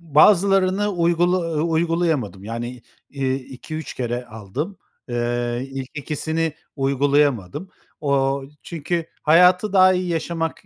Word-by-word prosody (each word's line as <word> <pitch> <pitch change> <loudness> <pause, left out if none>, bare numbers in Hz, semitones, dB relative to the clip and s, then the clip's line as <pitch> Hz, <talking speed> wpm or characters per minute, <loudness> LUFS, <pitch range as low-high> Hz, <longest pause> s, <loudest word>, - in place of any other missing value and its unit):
bazılarını 195 +3 +5
uygula 175 +1 +2 0.2
ııı, 150 - 0
uygulayamadım. 160 - 0
Yani, 120 +2 -5 0.3
iii, 135 -2 -1
2-3 140 +4 -7
kere 120 0 -3
aldım. 120 - -6 0.3
Eee, 120 +1 -1
ilk 135 -1 -5
2’sini 160 +2 -2 0.2
uygulayamadım. 140 - +1 0.3
Ooo, 140 -1 +1 0.2
çünkü 165 +1 -3 0.2
hayatı 180 +5 +5
daha 185 -1 +6
iyi 180 0 -1
yaşamak, 165 0 -2
150 Hz, 105 wpm, -22 LUFS, 130-175 Hz, 0.3 s, daha